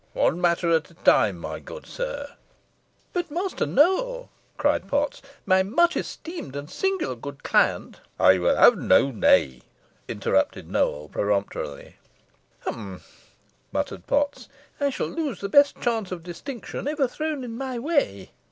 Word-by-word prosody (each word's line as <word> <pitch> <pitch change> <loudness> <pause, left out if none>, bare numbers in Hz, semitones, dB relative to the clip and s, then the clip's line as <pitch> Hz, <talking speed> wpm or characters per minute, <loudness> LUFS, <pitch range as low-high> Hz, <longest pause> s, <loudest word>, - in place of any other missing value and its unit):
One 175 - +1
matter 170 -1 +2
at 160 -1 +2
a 170 - -19
time, - - +3
my - - -6
good - - -10
sir." 285 -14 -5 0.8
"But, 355 -2 -2
Master 360 +5 -2
Nowell," - - +2 0.3
cried - - +1
Potts, 285 0 -1 0.2
"my 185 0 +4
much 335 - +2
esteemed 330 - -6
and 145 0 -5
singular 385 - -1
good 140 +4 -9
client - - +1
" - - -39
"I 95 0 +6
will 90 - +3
have - - +6
no 140 - +4
nay," 65 - +3 0.5
interrupted - - -1
Nowell, 75 +1 0
peremptorily. 100 -8 -2 0.6
"Hum!" 100 -5 -6 0.7
muttered 85 - -3
Potts; 285 0 0 0.3
"I 285 -1 +2
shall 270 - -2
lose 310 -6 -3
the 200 - -4
best 285 +5 +5
chance 225 -5 -1
of 175 -3 -5
distinction 235 - -7
ever 295 -2 +1
thrown 305 +1 -3
in 230 -2 -6
my 260 0 -4
way." 245 - -1
245 Hz, 145 wpm, -25 LUFS, -, 0.8 s, I